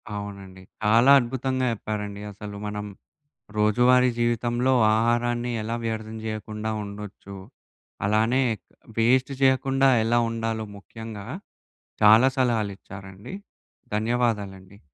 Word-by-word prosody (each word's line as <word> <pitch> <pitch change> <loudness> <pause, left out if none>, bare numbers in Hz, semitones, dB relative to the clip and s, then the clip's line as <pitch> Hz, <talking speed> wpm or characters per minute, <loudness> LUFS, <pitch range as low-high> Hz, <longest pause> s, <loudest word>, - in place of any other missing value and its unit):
అవునండి. 100 -2 -8 0.2
చాలా 115 +5 +5
అద్భుతంగా 130 +1 -2
చెప్పారండి 105 -1 -5
అసలు. 105 0 -9
మనం 105 0 -4 0.7
రోజువారీ 125 +4 +4
జీవితంలో 120 +2 +1 0.2
ఆహారాన్ని 120 +1 +1
ఎలా 115 +2 -3
వ్యర్థం 110 0 -4
జెయ్యకుండా 110 0 -4
ఉండొచ్చు. 100 -1 -9 0.7
అలానే 110 +6 +2 0.2
క్ - - -67 0.3
వేస్ట్ 130 +4 +3
జెయ్యకుండా 135 0 +3 0.2
ఎలా 120 +1 +2
ఉండాలో 115 -1 -3
ముఖ్యంగా, 110 0 -9 0.8
చాలా 110 +5 +7
సలహాలిచ్చారండి. 100 - -3 0.6
ధన్యవాదాలండి. 105 -4 -2
110 Hz, 90 wpm, -25 LUFS, 105-120 Hz, 0.8 s, చాలా